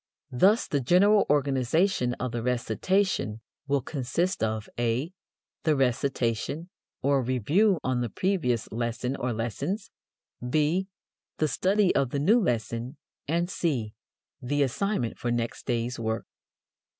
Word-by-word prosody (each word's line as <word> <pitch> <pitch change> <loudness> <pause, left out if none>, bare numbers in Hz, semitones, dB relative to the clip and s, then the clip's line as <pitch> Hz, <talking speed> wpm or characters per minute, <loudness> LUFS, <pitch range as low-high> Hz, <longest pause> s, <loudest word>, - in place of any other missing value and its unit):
Thus 195 - +4
the 145 - 0
general 200 - +4
organization 140 0 +2
of 130 -1 -3
the 120 0 -3
recitation 125 - 0 0.3
will 140 -2 +1
consist 150 - -1
of: 110 -1 -1
(a) 120 +8 0 0.5
The 155 -2 +2
recitation 135 - -1 0.3
or 140 0 +3
review 145 - +2
on 130 -1 0
the 120 - -1
previous 125 - 0
lesson 120 +3 -2
or 125 -2 -2
lessons; 135 - -3 0.6
(b) 155 +7 +1 0.5
the 155 - +2
study 190 +6 +2
of 135 -2 +2
the 140 - -2
new 210 +12 +4
lesson; 120 - -2 0.3
and 170 +3 +1
(c) 130 - -1 0.5
the 145 +3 +1
assignment 135 - -1
for 120 - -2
next 120 -1 -2
day's 120 0 -1
work. 110 0 -2
135 Hz, 125 wpm, -27 LUFS, 120-175 Hz, 0.6 s, Thus